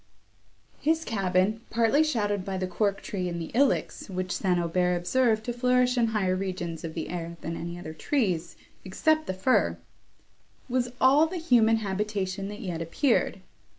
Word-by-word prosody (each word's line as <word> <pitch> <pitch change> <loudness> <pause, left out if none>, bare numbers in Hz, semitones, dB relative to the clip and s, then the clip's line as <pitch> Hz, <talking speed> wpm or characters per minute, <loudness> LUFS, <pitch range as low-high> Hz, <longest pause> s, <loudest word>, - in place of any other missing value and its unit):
His 320 +1 +1
cabin, 195 +1 +1
partly 230 +6 +3
shadowed 205 -10 0
by 190 0 -3
the 185 - -1
cork 200 +2 -1
tree 185 -3 -3
and 170 0 -4
the 165 - -6
ilex, 265 -3 +1
which 185 -1 -3
St. 180 -1 +1
Aubert 180 +1 +1
observed 220 +5 +1
to 240 - -3
flourish 250 +1 +2
in 235 -2 +3
higher 200 -4 0
regions 180 -4 -4
of 160 -1 -6
the 165 - -3
air 170 -1 -5
than 165 +1 -4
any 170 +1 -5
other 160 -3 -7
trees, 180 - -1 0.3
except 310 +11 +1
the - - -1
fir, 190 +8 +2 0.9
was 250 -1 0
all 285 +5 +5
the 360 +3 -5
human 240 -9 +4
habitation 195 -2 -2
that 205 +2 -7
yet 175 -6 -4
appeared. 195 - +1
200 Hz, 165 wpm, -27 LUFS, 180-245 Hz, 0.9 s, all